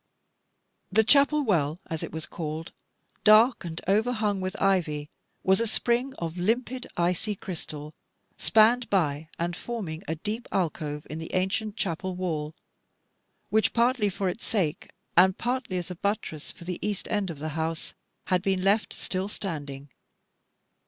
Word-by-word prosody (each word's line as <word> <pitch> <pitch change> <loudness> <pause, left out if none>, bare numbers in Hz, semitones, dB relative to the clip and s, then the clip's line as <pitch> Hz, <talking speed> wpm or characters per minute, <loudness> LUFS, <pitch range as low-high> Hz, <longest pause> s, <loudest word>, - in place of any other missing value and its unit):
The 220 +3 +5
chapel 285 +5 +5
well, 165 - +1
as 160 -1 -4
it - - -5
was 160 0 -4
called, 160 0 -5 0.5
dark 220 +3 +6
and 165 -1 -5
overhung 215 -1 +2
with 185 0 -3
ivy, 155 -6 +1 0.3
was 190 +1 +4
a 230 - +1
spring 245 +4 +1
of 165 0 -4
limpid 245 +6 0
icy 180 +5 +1
crystal, 155 -5 -7 0.4
spanned 225 +1 +4
by 155 -5 +1
and 170 +1 -1
forming 180 -7 -5
a 160 - -1
deep 215 +8 -4
alcove 150 -4 -1
in 155 - -5
the 160 - -6
ancient 190 +3 0
chapel 185 -2 -2
wall, 160 -4 -2 1.0
which, 220 0 +3
partly 235 -2 +3
for 195 0 -2
its 180 +5 -3
sake, 175 -9 -1 0.3
and 185 +2 +6
partly 245 -6 -1
as 180 0 -4
a - - -5
buttress 190 -5 -2
for - - -13
the 180 0 -4
east 205 -2 -2
end 205 -3 0
of 165 - -5
the 155 +2 -3
house, 160 +1 -3 0.3
had 185 -1 +2
been 190 -1 0
left 205 +3 +2
still 185 +1 -2
standing. 145 -9 -5
185 Hz, 150 wpm, -27 LUFS, 160-215 Hz, 1.0 s, dark